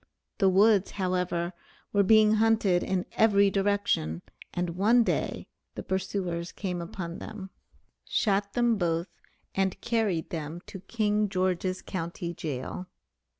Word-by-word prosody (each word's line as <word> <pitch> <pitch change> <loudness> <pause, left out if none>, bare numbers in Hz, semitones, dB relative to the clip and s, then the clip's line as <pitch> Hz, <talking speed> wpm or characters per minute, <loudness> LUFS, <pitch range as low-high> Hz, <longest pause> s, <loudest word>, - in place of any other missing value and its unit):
The 195 -3 +5
woods, 200 +1 +4
however, 180 -2 -1 0.4
were 205 - +4
being 215 +2 +5
hunted 215 -5 +3
in 190 -1 -1
every 200 -2 +4
direction, 195 - 0 0.3
and 175 -1 -2
one 215 +7 +4
day - - -1 0.3
the - - -5
pursuers 185 -2 -2
came 180 -3 -4
upon 170 0 -6
them, 195 -3 -8 0.5
shot 200 -3 0
them 240 -3 +2
both, 170 0 0 0.4
and 190 -1 0
carried 210 -8 -1
them 160 +1 -5
to 195 - -9
King 210 0 0
George's 185 -1 -1
Co. 170 -3 -3 0.3
jail. 155 +5 -5
190 Hz, 125 wpm, -28 LUFS, 175-205 Hz, 0.5 s, The